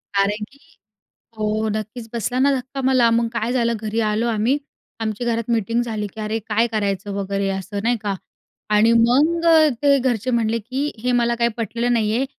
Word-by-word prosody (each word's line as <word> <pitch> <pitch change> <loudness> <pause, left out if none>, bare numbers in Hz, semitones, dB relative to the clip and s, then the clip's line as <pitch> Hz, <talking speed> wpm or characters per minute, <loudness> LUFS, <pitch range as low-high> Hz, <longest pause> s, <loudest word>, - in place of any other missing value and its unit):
कारण 205 +2 +1
की 280 - -21 0.8
हो, 215 +1 0
नक्कीच. 220 +2 -5
बसला 235 +2 -1
ना 275 +2 +4
धक्का 260 +2 -7
मला. 255 -3 +4
मग 230 0 +2
काय 235 0 -1
झालं 235 -2 +1
घरी 220 +1 -2
आलो 225 +3 0
आम्ही. 230 +5 +1 0.4
आमच्या 220 +2 -3
घरात 230 +1 -3
मीटिंग 230 +1 +1
झाली, 220 -3 -3
की 215 - -10
अरे, 215 +1 -2
काय 225 +2 +2
करायचं 200 -2 -1
वगैरे 200 0 -2
असं 195 +2 -4
नाही 240 +2 +2
का? 205 -2 -1 0.6
आणि 215 +2 +4
मग 290 +9 +3
अ, 320 -2 +6
ते 280 -1 +5
घरचे 250 -1 0
म्हटले 230 -1 +1
की 260 +7 -3
"हे 250 - +1
मला 235 0 +1
काही 235 0 +3
पटलेलं 235 +1 -1
नाही 220 -2 +1
आहे. 265 - +1
230 Hz, 190 wpm, -21 LUFS, 215-245 Hz, 0.8 s, अ